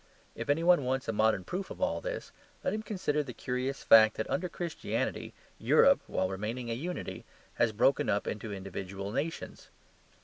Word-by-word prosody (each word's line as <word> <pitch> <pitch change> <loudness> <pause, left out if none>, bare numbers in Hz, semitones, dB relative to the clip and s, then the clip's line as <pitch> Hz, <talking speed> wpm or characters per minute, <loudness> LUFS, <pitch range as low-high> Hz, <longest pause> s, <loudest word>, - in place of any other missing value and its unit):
If - - -6
any 150 +3 +2
one 175 -4 +5
wants 130 +1 -1
a 115 - 0
modern 110 -3 +2
proof 190 - -4
of - - -8
all - - 0
this, - - -5 0.3
let - - 0
him 215 - -2
consider 185 -9 -1
the 130 -5 -7
curious 130 +1 -3
fact 110 -1 +7
that, 110 - -2
under 180 0 -1
Christianity, 170 -1 -3 0.3
Europe - - +5
(while 95 - 0
remaining 110 +6 -4
a - - +1
unity) 170 +10 -5 0.4
has 120 -2 +4
broken 120 +6 +2
up 100 - +1
into 110 0 -4
individual 95 0 -5
nations. 155 +8 -4
125 Hz, 175 wpm, -31 LUFS, 110-165 Hz, 0.4 s, fact